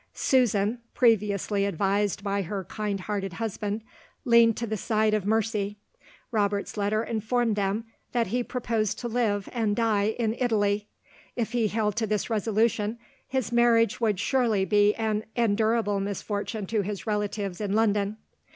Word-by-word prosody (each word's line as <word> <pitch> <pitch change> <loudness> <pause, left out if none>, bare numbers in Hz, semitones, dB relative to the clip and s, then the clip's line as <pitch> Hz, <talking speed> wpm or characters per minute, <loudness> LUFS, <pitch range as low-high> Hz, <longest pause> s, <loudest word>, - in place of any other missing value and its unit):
Susan 235 -3 +2 0.2
(previously 210 -4 +2
advised 200 +1 0
by 200 -1 0
her 195 +1 -4
kind 205 0 -3
hearted 195 -1 -3
husband) 215 0 -3 0.4
leaned 235 -2 +5
to 235 - -2
the 220 -1 -2
side 215 +1 +1
of 210 -2 0
mercy. 210 -2 0 0.5
Robert's 205 -2 0
letter 210 +1 0
informed 230 0 0
them 205 +2 -1 0.3
that 240 -1 +1
he 245 +2 -1
proposed 225 -4 -1
to 240 - -4
live, 220 -4 0
and 220 -4 0
die, 220 -2 +1
in 225 -2 0
Italy. 210 -4 +1 0.5
If 235 -3 -2
he 235 -3 +1
held 210 -1 0
to 225 -1 0
this 210 +1 -1
resolution, 220 0 +1 0.3
his 260 -4 -2
marriage 235 -2 +3
would 210 -5 +1
surely 225 -4 +2
be 205 0 +4
an 220 -1 -1
endurable 220 -2 +2
misfortune 205 +1 -3
to 215 +2 0
his 200 0 -5
relatives 205 -3 -2
in 200 -1 -1
London. 210 -1 +1
215 Hz, 150 wpm, -27 LUFS, 205-230 Hz, 0.5 s, leaned